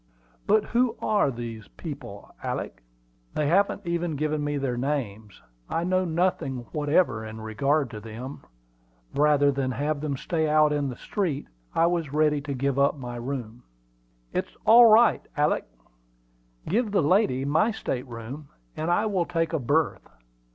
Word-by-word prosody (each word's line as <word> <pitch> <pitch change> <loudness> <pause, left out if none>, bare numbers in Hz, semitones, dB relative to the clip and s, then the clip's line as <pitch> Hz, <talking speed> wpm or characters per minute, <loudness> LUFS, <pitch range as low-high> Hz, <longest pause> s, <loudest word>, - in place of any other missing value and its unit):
"But 215 +1 +4
who 240 -1 +1
are 210 -9 +2
these 115 -3 -6
people, - - -9
Alick?" - - -4 0.5
"They 150 - +1
haven't 195 +6 +2
even 170 -2 -1
given 155 +1 -1
me 145 0 -1
their 135 -3 -1
names; 115 -7 -3 0.3
I 165 - -1
know 185 +1 +1
nothing 160 -7 -1
whatever 145 -6 +1
in 110 0 -8
regard 135 +7 0
to 105 - -6
them. 115 +5 -8 0.7
Rather 145 0 +4
than 135 -1 -1
have 145 +3 -1
them 145 -3 -2
stay 160 +1 -1
out 150 0 +4
in 145 -2 0
the 125 - -6
street, 170 -9 -2 0.3
I 165 - +4
was 170 -5 -1
ready 150 -1 +2
to 140 -1 -4
give 140 +1 0
up 140 +1 +3
my 120 -2 -6
room." 120 -2 -5 0.7
"It's - - -3
all 235 +2 +9
right, 225 +1 +6 0.2
Alick. 150 +1 +2 1.0
Give 220 +5 +1
the 200 -5 +2
lady 145 - +2
my 160 +10 +3
state 130 - -3
room, 120 +5 -8 0.3
and 160 - -2
I 175 +5 +2
will 190 -5 0
take 165 -1 -1
a 160 - +1
berth. 145 +5 0
145 Hz, 160 wpm, -26 LUFS, 130-170 Hz, 1.0 s, all